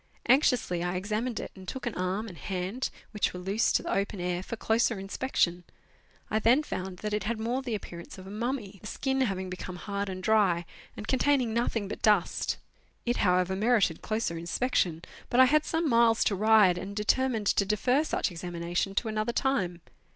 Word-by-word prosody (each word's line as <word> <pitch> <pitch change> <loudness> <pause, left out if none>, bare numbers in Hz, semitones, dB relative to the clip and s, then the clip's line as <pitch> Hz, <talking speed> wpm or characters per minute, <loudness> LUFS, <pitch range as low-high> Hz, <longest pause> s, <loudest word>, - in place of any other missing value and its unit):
Anxiously 245 - +3
I 175 +1 -1
examined 215 +5 -2
it, - - -6
and 190 -1 -12
took 265 - -5
an 240 - -2
arm 185 +4 -2
and 185 - -9
hand, 190 +8 -3 0.2
which 210 -3 -1
were - - -5
loose, 195 +5 +1
to - - +2
the - - -2
open 200 0 -1
air 175 0 -1
for 210 - -5
closer 225 +1 +1
inspec 195 +7 -5
tion. 175 0 +2 0.7
I 215 - +2
then 240 +7 +4
found 185 -9 -5
that 210 - -1
it 210 -2 -1
had 230 +1 -1
more 240 +4 -1
the 245 -4 -3
appearance 170 -4 -8
of 185 - -10
a 190 - -9
mummy, 215 -3 -3
the 210 - -8
skin 265 +3 -1
having 190 -6 -1
become 185 0 -6
hard 200 +2 -3
and 185 0 -6
dry, 195 -6 +3 0.3
and 210 - -7
containing 260 -3 +2
nothing 230 -3 0
but - - -6
dust. 210 -5 +2 0.5
It 240 0 +1
however 180 0 +2
merited 210 -5 +2
closer 215 -7 -2
inspection, 170 -2 0 0.3
but 245 - +2
I 260 - +9
had 305 +3 +3
some 325 0 0
miles 230 -3 +4
to 200 - +1
ride, 210 -3 +5
and 200 +1 -6
determined 220 +2 +1
to 200 - +3
defer 245 +8 +2
such 310 - -1
examination 175 +2 -3
to 225 - 0
another 215 +2 -1
time. 190 -12 0
210 Hz, 195 wpm, -29 LUFS, 185-235 Hz, 0.7 s, I